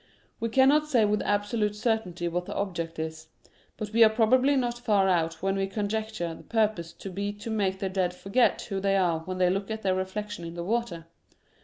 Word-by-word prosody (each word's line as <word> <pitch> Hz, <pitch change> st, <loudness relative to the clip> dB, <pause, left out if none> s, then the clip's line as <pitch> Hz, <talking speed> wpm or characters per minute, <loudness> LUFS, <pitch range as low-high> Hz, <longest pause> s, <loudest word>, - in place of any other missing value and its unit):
We 230 Hz, 0 st, -1 dB
cannot 275 Hz, +5 st, +4 dB
say 240 Hz, -7 st, +3 dB
with 210 Hz, 0 st, +1 dB
absolute 205 Hz, +1 st, 0 dB
certainty 210 Hz, -6 st, -1 dB
what 175 Hz, +1 st, -2 dB
the -, -, -5 dB
object 170 Hz, -4 st, -3 dB
is 160 Hz, 0 st, -5 dB, 0.3 s
— -, -, -34 dB
but 210 Hz, -1 st, -5 dB
we 230 Hz, 0 st, +7 dB
are 220 Hz, -, +7 dB
probably 250 Hz, +5 st, +3 dB
not 240 Hz, -2 st, -1 dB
far 210 Hz, -5 st, +2 dB
out 165 Hz, -2 st, 0 dB
when 195 Hz, 0 st, +1 dB
we 195 Hz, 0 st, 0 dB
conjecture 210 Hz, -3 st, -3 dB
the -, -, -11 dB
purpose 215 Hz, -7 st, 0 dB
to 195 Hz, -, -8 dB
be 200 Hz, +2 st, -2 dB
to 205 Hz, +2 st, -7 dB
make 195 Hz, -3 st, 0 dB
the 195 Hz, -, -2 dB
dead 185 Hz, -1 st, 0 dB
forget 195 Hz, +7 st, +1 dB
who 195 Hz, -3 st, -3 dB
they 195 Hz, 0 st, +2 dB
are 175 Hz, -4 st, +2 dB
when 185 Hz, +3 st, -6 dB
they 180 Hz, -1 st, +3 dB
look 195 Hz, +2 st, -2 dB
at 220 Hz, 0 st, -4 dB
their 190 Hz, -1 st, +2 dB
reflection 190 Hz, +1 st, -4 dB
in 170 Hz, 0 st, -7 dB
the 170 Hz, -, -4 dB
water. 200 Hz, -5 st, -2 dB
200 Hz, 215 wpm, -27 LUFS, 180-220 Hz, 0.3 s, we